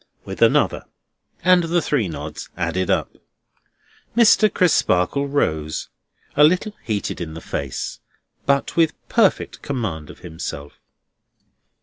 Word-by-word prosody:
with - - -7
another - - +3 0.6
and 180 -1 +5
the 170 +1 +2
three 140 - 0
nods 75 -1 -7
added 95 -1 -1
up. - - 0 1.0
Mr. 215 -2 +6
Crisparkle 140 - +2
rose; 80 - -1 0.5
a 150 - +6
little 185 +7 +3
heated 105 -4 -3
in 80 -2 -5
the - - -6
face, 70 -4 -4 0.5
but 140 0 +1
with 165 -2 +3 0.2
perfect 225 -5 +2
command 100 - -4
of - - -11
himself. 80 -4 -7
120 Hz, 115 wpm, -21 LUFS, -, 1.0 s, Mr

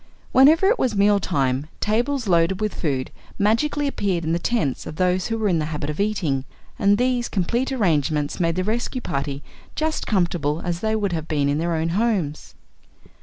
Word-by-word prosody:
Whenever 305 +8 +6
it 450 +2 +2
was 240 -4 +1
meal 200 0 +4
time, 135 -6 -1
tables 245 +3 0
loaded 175 +1 +2
with 215 -1 -1
food 135 -6 -2 0.3
magically 290 +8 +1
appeared 195 -10 -1
in 160 +1 0
the 170 - 0
tents 170 - -1
of - - -7
those 180 +1 +1
who 225 - -2
were 220 -1 0
in 175 -4 +2
the 155 - -1
habit 150 -1 -3
of 150 - -9
eating, 190 -11 0 0.4
and 200 +1 +4
these 250 0 0
complete 235 +8 -1
arrangements 155 - 0
made 165 -2 +1
the 185 - 0
rescue 235 +5 -2
party 140 - -4 0.3
just 315 0 -2
comfortable 170 -6 0
as 175 -1 -2
they 220 +2 0
would 200 -4 -1
have 160 -1 -3
been 145 -3 0
in 145 +1 0
their 170 +1 0
own 160 +1 -1
homes. 185 -6 -1
185 Hz, 190 wpm, -22 LUFS, 155-225 Hz, 0.4 s, Whenever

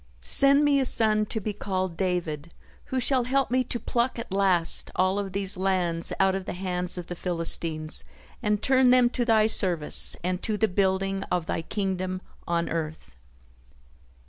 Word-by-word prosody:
Send 280 +1 +4
me 285 -1 +3
a 265 - 0
son 215 -3 +1
to 220 - -4
be 210 0 -4
called 185 -3 -4
David 170 -4 -3 0.3
who 260 -2 -3
shall 255 -1 +1
help 270 0 0
me 255 0 +1
to 240 - -4
pluck 240 +2 -2
at 230 -4 -8
last 185 -4 +3
all 185 +2 +1
of 195 -1 -5
these 195 0 +2
lands 180 -3 0
out 190 0 +3
of 190 -1 -4
the - - -5
hands 180 -1 -3
of 175 - -6
the 175 - -7
Philistines 165 -2 +1 0.4
and 210 -2 -1
turn 260 -1 +3
them 250 -1 +4
to 250 - -1
Thy 220 -2 +3
service 180 -8 +3
and 180 +1 -3
to 215 -2 -2
the 220 - +1
building 195 0 -1
of 175 -2 -1
Thy 165 - -3
kingdom 185 0 -4 0.3
on 170 0 -1
earth." 155 - -6
190 Hz, 175 wpm, -25 LUFS, 180-225 Hz, 0.4 s, Send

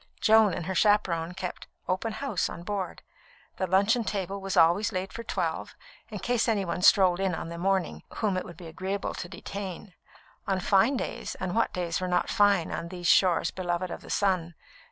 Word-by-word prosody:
Joan 220 -4 +5
and 175 - -4
her 190 - -2
chaperon 180 -4 +2
kept 185 -2 -6 0.2
"open 200 +5 -1
house" 270 -9 -1
on 170 - -8
board. 195 -1 -4 0.5
The 185 - -1
luncheon 200 +6 +3
table 195 -1 -3
was 195 0 -3
always 175 +7 +4
laid 185 -1 -4
for 230 - -6
twelve, - - -3 0.3
in - - -6
case 245 -1 0
any 210 -4 +1
one 175 +1 -3
strolled 185 -1 +5
on 190 -3 0
in 165 - -6
the 170 0 -7
morning 190 0 0
whom 210 -4 0
it 185 - -1
would 170 - -11
be 175 - -10
agreeable 190 +4 -4
to 175 - -6
detain. 195 0 -7 0.5
On 195 -1 +1
fine 205 +8 +3
days - - -4
and 185 -1 -4
what 230 - +2
days 175 -2 -2
were 185 - -1
not 180 -1 0
fine 205 -5 +3
on 170 - -4
these 175 0 -8
shores 180 0 +4
beloved 180 -1 -2
of - - -6
the - - -13
sun? 180 -4 0
190 Hz, 195 wpm, -28 LUFS, 175-205 Hz, 0.5 s, Joan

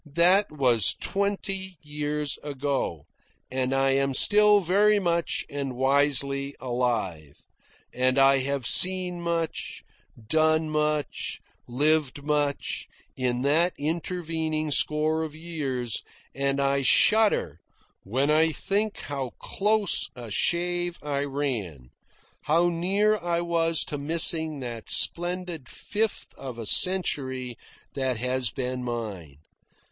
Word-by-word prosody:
That 180 +3 +4
was 125 -8 +3
twenty 195 -2 -2
years 150 -1 -2
ago, 140 - -3 0.5
and 130 0 -1
I 135 0 +2
am 135 0 +1
still 210 +3 +5
very 200 +4 +3
much 170 -3 0
and 140 -3 -4
wisely 140 +1 +2
alive; 115 - -2 0.6
and 130 +1 +1
I 135 0 +5
have 135 -1 -2
seen 180 +1 +2
much, 170 -1 -3 0.4
done 155 +2 +2
much, 150 -1 -1 0.3
lived 145 +2 0
much, 145 -1 -1 0.3
in 125 -1 -1
that 165 +6 +3
intervening 160 -1 -2
score 155 +2 +1
of 155 -1 -5
years; 140 -8 -3 0.3
and 140 0 -1
I 140 0 +1
shudder 200 - +3 0.4
when 130 +9 0
I 160 +1 +4
think 205 +6 -2
how 135 -4 -5
close 210 -1 0
a 120 -3 -9
shave 175 - 0
I 145 -1 -2
ran, 115 - -4 0.5
how 170 +4 +3
near 195 +5 +1
I 170 0 -1
was 165 -1 +1
to 150 -5 -5
missing 160 0 +1
that 120 -3 -7
splendid 175 -5 0
fifth 215 +1 -3
of 130 -3 -7
a 115 - -6
century 130 - +1 0.4
that 130 -3 -1
has 125 0 +1
been 125 0 -4
mine. 105 - -5
145 Hz, 115 wpm, -26 LUFS, 130-170 Hz, 0.6 s, still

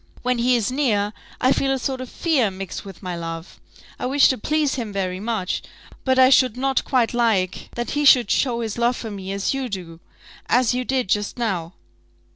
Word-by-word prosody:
When 250 -1 +1
he 245 +1 +3
is 235 0 0
near 215 -7 +1 0.3
I 255 - +3
feel 270 0 +1
a 270 - +1
sort 260 0 -3
of 255 - -7
fear 285 -10 +1
mixed 190 -1 -6
with 195 0 -11
my 180 -1 -4
love. 165 0 -7 0.4
I - - -2
wish 275 +2 +5
to 260 - 0
please 300 +3 +1
him 230 -5 -4
very 185 -2 -2
much, 215 -3 -2 0.4
but 260 -1 +2
I 260 0 +6
should 255 -3 +4
not 270 +1 +1
quite 250 -4 +1
like 220 -6 0
that 240 0 -3
he 295 +1 0
should 250 -7 +6
show 240 -3 +1
his 225 0 -4
love 240 +1 +2
for 225 - -6
me 195 -1 -6
as 200 +4 -1
you 270 -2 -3
do 175 -5 -7 0.5
as 250 0 +3
you 250 0 -1
did 255 -3 -1
just 205 +4 -1
now." 185 -8 -2
235 Hz, 210 wpm, -22 LUFS, 195-260 Hz, 0.5 s, I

